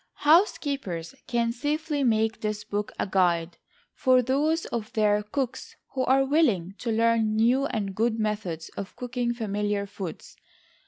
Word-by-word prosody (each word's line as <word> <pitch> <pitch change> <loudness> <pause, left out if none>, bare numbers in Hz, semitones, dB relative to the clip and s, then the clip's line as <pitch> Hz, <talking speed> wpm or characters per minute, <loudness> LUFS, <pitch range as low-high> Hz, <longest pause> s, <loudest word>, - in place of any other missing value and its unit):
Housekeepers 280 - +2
can 235 -1 +1
safely 295 +3 -1
make 220 -2 +1
this 210 -1 -2
book 205 0 -3
a - - 0
guide 175 -3 +1 0.4
for 255 -1 +3
those 300 +6 +1
of 230 -1 -4
their 210 -2 +3
cooks 245 +4 -4 0.2
who 260 -1 0
are 270 +1 +4
willing 240 - +2
to 235 - -2
learn 225 -1 +2
new 245 +5 +3
and 200 -6 -3
good 225 +2 0
methods 205 -7 -2
of 200 - -8
cooking 245 -1 -2
familiar 205 -3 -1
foods. 195 -4 -8
225 Hz, 145 wpm, -26 LUFS, 205-260 Hz, 0.4 s, are